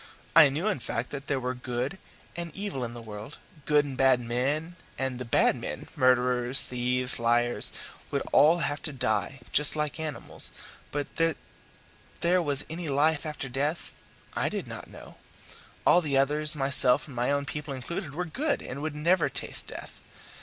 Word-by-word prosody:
I 155 -3 +9
knew, 155 +9 -2
in 210 -9 0
fact, 115 0 -4
that 140 0 -6
there 140 -2 0
was 125 0 -3
good 130 +9 -3 0.4
and 170 -1 -5
evil 195 -10 -3
in 120 0 -5
the 120 - -8
world, 110 +4 -8 0.3
good 150 -1 +3
and 135 -2 -6
bad 130 -1 +4
men, 135 +8 -2 0.2
and 130 -2 -3
the 125 - -5
bad 115 - +3
men - - -6
murderers, 125 0 +3
thieves, 125 0 +1
and - - -7
liars 120 +1 +3 0.4
would - - -1
all 160 +4 +6
have 145 0 -3
to 150 - -3
die, 130 +1 -1
just 150 +1 +4
like 150 +1 -2
animals; 155 -2 -4 0.4
but 145 -1 -4
that 165 -2 +2 0.8
there 175 +2 +3
was 145 -3 -1
any 165 0 -4
life 150 +3 +2
after 150 -2 -5
death 145 +6 -2 0.4
I - - 0
did - - -4
not - - -9
know. - - -13 0.7
All 175 - +6
the 145 -4 0
others, 150 +3 +3
myself 135 -3 +6
and 140 - -11
my 120 +2 0
own 140 0 0
people 150 0 -5
included, 140 +4 -5
were 180 +2 -2
good 280 - -1
and 135 +3 -6
would 155 -1 -3
never 170 +2 +2
taste - - -2
death. - - -8
140 Hz, 180 wpm, -28 LUFS, 125-155 Hz, 0.8 s, I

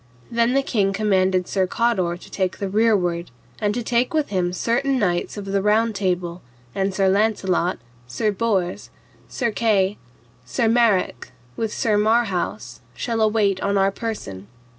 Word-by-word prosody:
Then 235 +2 +2
the 275 - +3
king 200 -7 +1
commanded 190 -3 +1
Sir 190 -2 0
Cador 185 -7 0
to - - -15
take 185 -3 -1
the 200 - -3
rearward, 190 -5 +1 0.3
and 210 -2 +1
to 245 - -2
take 245 +5 0
with 305 -2 +1
him 180 -3 0
certain 250 +8 0
knights 180 -3 -1
of 205 - -5
the 195 0 0
Round 220 +2 +2
Table, 180 -3 -2 0.3
and 195 0 0
Sir 195 0 +1
Launcelot, 190 -3 +1 0.3
Sir 125 - 0
Bors, 195 -4 -1 0.4
Sir 240 -3 -1
Kay, 205 -3 +1 0.4
Sir 225 - 0
Marrok, 225 -4 +2 0.3
with 225 -2 -2
Sir 210 -1 +1
Marhaus, 215 -4 0 0.2
shall 230 -3 -2
await 210 -3 +2
on 200 0 +1
our 195 0 +3
person. 145 - -6
200 Hz, 155 wpm, -22 LUFS, 185-225 Hz, 0.4 s, the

